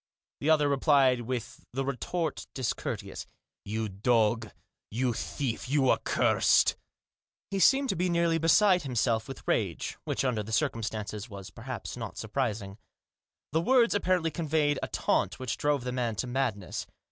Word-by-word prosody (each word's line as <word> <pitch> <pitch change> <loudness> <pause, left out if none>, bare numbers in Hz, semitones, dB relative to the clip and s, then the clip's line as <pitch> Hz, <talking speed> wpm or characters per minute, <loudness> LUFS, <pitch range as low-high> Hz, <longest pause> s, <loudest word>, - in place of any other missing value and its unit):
' - - -68
The 150 - +1
other 150 -2 +5
replied 135 -3 +4
with 120 -1 -5
the 135 +1 -1
retort 150 +5 -3
discourteous. 130 -3 -3 0.2
" - - -63
You 110 0 -1
dog 110 +2 +1
I - - -17 0.4
You 125 +2 0
thief! 125 +1 -3
You 135 -2 +3
accursed! - - +3 0.4
" - - -67
He 195 - -1
seemed 270 +6 +5
to - - +1
be 180 +2 0
nearly 170 -1 +2
beside 180 +3 +5
himself 115 -4 0
with 135 - -8
rage, 95 -8 -1
which - - -1
under 120 -4 +1
the 105 +2 -7
circumstances, 110 -1 -2 0.3
perhaps, 120 -2 -6
was - - -7
not 115 -4 -6
surprising. 110 -4 -3 0.7
The 160 +3 +2
words 240 +4 +4
apparently 185 -5 +1
conveyed 150 -2 +1
a - - -2
taunt 95 - 0
which 130 -2 -3
drove 145 -3 0
the 125 - -3
man 120 -3 -1
to 115 - -2
madness. 120 -7 -2
130 Hz, 160 wpm, -29 LUFS, 110-155 Hz, 0.7 s, other